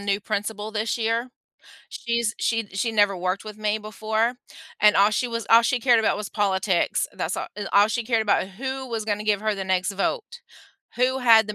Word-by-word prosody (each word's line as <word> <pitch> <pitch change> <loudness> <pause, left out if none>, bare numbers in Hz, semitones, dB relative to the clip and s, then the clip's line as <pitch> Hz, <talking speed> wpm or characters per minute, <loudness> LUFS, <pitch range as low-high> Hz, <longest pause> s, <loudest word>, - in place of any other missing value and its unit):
new 200 0 0
principal 210 +1 -3
this 220 +1 -2
year. 230 +2 -1 0.6
She's 235 -2 -2
she 225 -2 0
she 205 +4 -1
never 205 -2 +3
worked 185 +3 -2
with 215 -1 -8
me 215 0 -1
before 220 +2 -1 0.5
and 210 0 +6
all 200 +1 +6
she 230 +4 0
was 230 -2 -4
all 230 +1 +7
she 245 +1 0
cared 240 -1 +4
about 220 - +1
was 210 -1 -5
politics, 190 -3 0
that's - - -3
a - - -4
a 205 -1 -5
all 205 +1 +6
she 235 +1 -2
cared 230 -1 +1
about 210 -3 +1
who 265 +6 -5
was 225 -2 -3
gonna 210 0 -2
give 210 -2 +1
her 215 0 0
the 195 -1 -4
next 185 0 0
vote, 470 - -3 0.6
who 255 +2 +1
had 225 -4 +6
the 210 - -5
215 Hz, 210 wpm, -24 LUFS, 205-230 Hz, 0.6 s, all